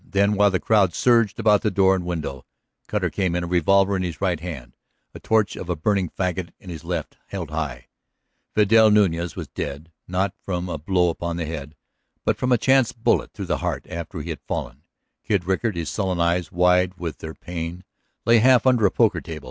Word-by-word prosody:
Then, 100 +1 +1
while 105 0 +4
the 95 -2 0
crowd 100 -6 +2
surged 115 -3 +3
about 105 -2 +4
door 95 -3 +3
and 90 - -3
window. 75 -6 -4 0.4
Cutter - - -1
came 95 -3 -1
in, 90 - -1
a - - -4
revolver 95 +3 +3
in 95 - -1
his 85 -4 -4
right 90 -4 0
hand, 75 -8 -8 0.4
a - - -9
torch 110 -2 +1
of 90 - -7
a 90 - 0
burning 95 +2 0
fagot 90 -1 -2
in 90 - -10
his 80 -2 -8
left, 85 -3 -4
held 90 -6 -6
high. 70 -6 -4 0.7
Vidal 110 +1 +6
Nuñez 90 -5 +2
was - - -6
dead; 75 +4 -6 0.2
not 95 +2 -1
from 90 -1 -3
a - - -4
blow 90 +2 +2
upon 85 0 -4
the 85 - -2
head, 75 -1 -6 0.5
but - - +2
from 125 - -1
a 125 - +5
chance 130 0 +3
bullet 115 - 0
through - - -5
the - - -1
heart - - -3
after 85 -1 -5
he 85 - -5
had 80 - -7
fallen. 65 - -4 0.4
Kid 100 -5 0
Rickard, 95 +3 0
his 85 -2 -3
sullen 95 -4 -2
eyes 85 +1 +1
wide 90 +1 +3
with 85 -3 -5
their 80 0 -7
pain, 85 +1 -6 0.4
lay 115 0 +6
half 125 +1 +5
under 125 -5 +4
a - - -1
poker - - +2
table. 80 -1 -7
90 Hz, 205 wpm, -23 LUFS, 85-100 Hz, 0.7 s, Vidal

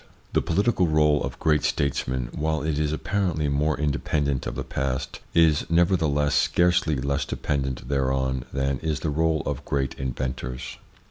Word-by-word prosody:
The - - +3
political 100 +1 +2
role 75 -2 +3
of - - -4
great 75 -2 +2
statesmen, 65 -3 -1
while 80 0 -1
it 75 -1 -1
is 75 -1 +1
apparently 85 -2 -1
more 75 +1 +1
independent 70 -1 0
of - - -4
the - - -3
past, 65 0 -3 0.2
is, 80 -2 +4
never 85 +3 +4
theless, 75 -3 +1
scarcely 85 +2 +3
less 70 +1 -1
dependent 65 -4 -3
thereon 65 -2 0
than 70 0 -1
is 80 -2 -2
the 80 - -1
role 80 0 +1
of - - -3
great 70 -2 -1
inventors. 65 -1 -4
75 Hz, 155 wpm, -25 LUFS, 65-80 Hz, 0.2 s, is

